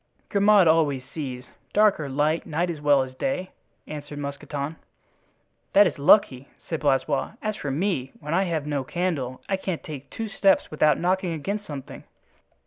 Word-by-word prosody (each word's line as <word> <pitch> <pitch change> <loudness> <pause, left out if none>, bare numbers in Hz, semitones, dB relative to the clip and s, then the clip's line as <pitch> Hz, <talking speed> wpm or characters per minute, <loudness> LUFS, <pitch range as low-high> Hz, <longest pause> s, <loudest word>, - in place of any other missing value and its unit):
"Grimaud 200 -2 +5
always 150 -5 +3
sees, 130 -3 -6 0.3
dark 210 -3 +4
or 145 -3 -4
light, 150 +4 0
night 170 +3 0
as 155 -3 -7
well 145 -2 +4
as 130 0 -9
day," 185 - -3 0.3
answered 145 -1 -7
Mousqueton. 140 +1 -5 1.0
"That 205 +1 +8
is 180 - -1
lucky," 140 -4 +4 0.2
said 160 - -2
Blaisois. 140 +5 +1
"As 215 -1 -2
for 145 - -5
me, 140 -3 -1
when 150 +2 -4
I 190 +3 +3
have 160 -4 -2
no 145 -2 -1
candle 140 -5 -3
I 195 - 0
can't 190 -3 -4
take 145 -3 -8
two 225 - -5
steps 195 -2 +2
without 155 0 +3
knocking 180 0 0
against 200 +7 -4
something." 140 -3 -8
155 Hz, 165 wpm, -25 LUFS, 140-185 Hz, 1.0 s, That